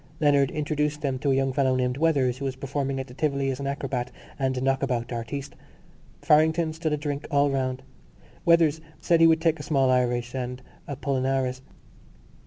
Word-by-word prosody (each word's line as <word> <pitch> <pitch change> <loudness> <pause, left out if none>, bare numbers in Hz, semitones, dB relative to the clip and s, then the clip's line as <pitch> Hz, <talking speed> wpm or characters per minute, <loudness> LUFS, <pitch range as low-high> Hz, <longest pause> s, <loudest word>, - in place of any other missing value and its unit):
Leonard 140 -3 +3
introduced 150 0 -2
them 135 -3 -1
to 140 - -1
a - - +3
young 135 0 +1
fellow 130 -1 +2
named 125 0 0
Weathers 135 -5 +1
who 140 - -4
was 135 -1 -2
performing 135 0 -3
at 130 - -4
the 125 - -13
Tivoli 140 -1 0
as 130 - -5
an 140 - -3
acrobat 135 -3 -3 0.3
and 130 -1 0
knockabout 130 -2 0
artiste. 135 +4 -5 0.7
Farrington 160 +1 +3
stood 160 0 -2
a - - +1
drink 145 -1 -4
all 140 0 +3
round. 130 -1 -2 0.6
Weathers 165 -2 +4 0.2
said 170 +1 +2
he 165 - +8
would 160 0 +3
take 165 -1 +1
a - - -6
small 135 -4 +2
Irish 120 -1 0
and 125 -1 -4 0.3
Apollinaris. 130 -2 -1
135 Hz, 180 wpm, -26 LUFS, 130-150 Hz, 0.7 s, he